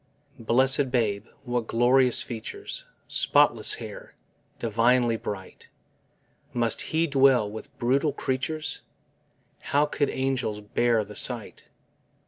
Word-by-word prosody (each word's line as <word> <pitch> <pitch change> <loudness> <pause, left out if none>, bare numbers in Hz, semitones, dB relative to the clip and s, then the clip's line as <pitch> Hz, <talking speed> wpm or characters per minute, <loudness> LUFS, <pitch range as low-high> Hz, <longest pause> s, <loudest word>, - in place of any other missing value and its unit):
Blessèd 130 +4 +3
babe! 110 -4 -1 0.2
what 120 -2 -2
glorious 125 +2 +3
features 410 - -7 0.2
Spotless - - +2
fair, - - -10 0.4
divinely 115 +1 +2
bright! 100 -4 -8 0.8
Must 120 -2 +1
He 160 +1 0
dwell 135 -6 +4
with 110 +6 -10
brutal 140 +4 +1
creatures 145 +3 -3 0.8
How 145 +1 +1
could 145 -1 -1
angels 130 -5 -2
bear 110 +2 +1
the 105 0 -12
sight? 115 0 0
125 Hz, 105 wpm, -26 LUFS, 115-140 Hz, 0.8 s, dwell